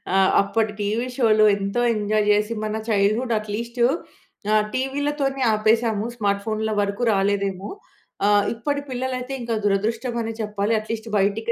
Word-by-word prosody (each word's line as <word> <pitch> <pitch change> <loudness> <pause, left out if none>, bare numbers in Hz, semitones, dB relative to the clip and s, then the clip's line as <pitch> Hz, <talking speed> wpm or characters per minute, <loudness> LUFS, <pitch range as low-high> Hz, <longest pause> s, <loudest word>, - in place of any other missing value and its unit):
ఆహ్, 195 0 +5
అప్పటి 215 +2 0
టీవీ 220 +4 -1
షోలు 215 -4 +4
ఎంతో 200 +4 -2
ఎంజాయ్ 210 0 +1
చేసి 210 +2 0
మన 215 0 -2
చైల్డ్‌హుడ్ 215 +4 +2
అట్‌లీస్ట్ 230 +3 -5 0.7
ఆ! - - +4 0.2
టీవీలతోనే 275 +1 -1
ఆపేసాము 220 0 +2
స్మార్ట్ 200 -3 0
ఫోన్‌ల 220 0 -1
వరకు 200 +3 -2
రాలేదేమో! 195 -1 0 0.6
ఆహ్, 205 0 +4
ఇప్పటి 285 +5 -2
పిల్లలయితే 255 +1 -3
ఇంకా 235 -1 -2
దురదృష్టం 225 +5 0
అనే 225 - -4
చెప్పాలి 210 +1 -1
అట్‌లీస్ట్ 220 +1 -5
బయటికి 205 +4 +1
215 Hz, 135 wpm, -23 LUFS, 205-235 Hz, 0.7 s, ఆహ్